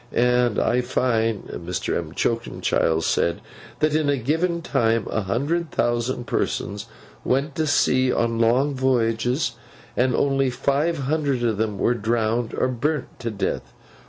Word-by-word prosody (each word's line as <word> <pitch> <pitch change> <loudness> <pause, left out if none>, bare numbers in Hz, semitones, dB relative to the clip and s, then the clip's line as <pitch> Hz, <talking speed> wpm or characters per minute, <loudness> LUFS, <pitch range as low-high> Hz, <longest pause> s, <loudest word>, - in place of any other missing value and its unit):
And 125 -2 +2
I 125 +1 +2
find 115 -4 0
(Mr. 90 +1 -4
M'Choakumchild 80 -2 0
said) 85 +1 +1 0.4
that 155 -1 +2
in 155 -2 +2
a 140 - +2
given 165 +7 0
time 115 -4 +1
a 110 - 0
hundred 145 - -1
thousand 120 +1 -1
persons 100 -3 -2 0.4
went 140 +4 0
to 160 -1 +1
sea 130 -3 +3
on 115 -1 0
long 125 +5 +3
voyages, 125 0 +1 0.4
and 125 +1 +2
only 135 -1 +2
five 140 +6 0
hundred 140 -2 0
of 115 -3 +1
them 105 -2 -1
were 120 - +2
drowned 115 0 0
or - - +1
burnt 135 +4 -2
to 115 - -3
death. 105 -3 -3
125 Hz, 140 wpm, -23 LUFS, 115-140 Hz, 0.4 s, sea